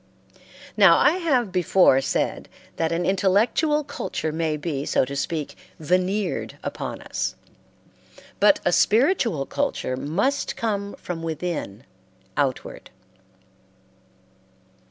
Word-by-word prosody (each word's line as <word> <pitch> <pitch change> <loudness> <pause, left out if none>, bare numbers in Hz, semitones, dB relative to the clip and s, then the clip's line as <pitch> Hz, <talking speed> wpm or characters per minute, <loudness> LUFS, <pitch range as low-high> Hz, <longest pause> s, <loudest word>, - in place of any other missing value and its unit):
Now - - +7
I 310 +5 +4
have 260 - +1
before 180 -6 +4
said - - -2 0.3
that 165 -1 0
an 170 +1 -1
intellectual 210 - +2
culture 160 - -4
may 160 -1 -1
be, 150 -3 -3
so - - +1
to 140 +2 -6
speak, 150 +1 -3 0.2
veneered 185 +5 -1
upon - - -5
us, - - -3 1.0
but 295 +1 +5
a 175 - +3
spiritual 225 - +2
culture 130 - -2
must 190 - -1
come 205 -3 -3
from 170 -2 -6
within 160 - -4 0.5
outward. 135 -3 -2
180 Hz, 105 wpm, -23 LUFS, 155-220 Hz, 1.0 s, Now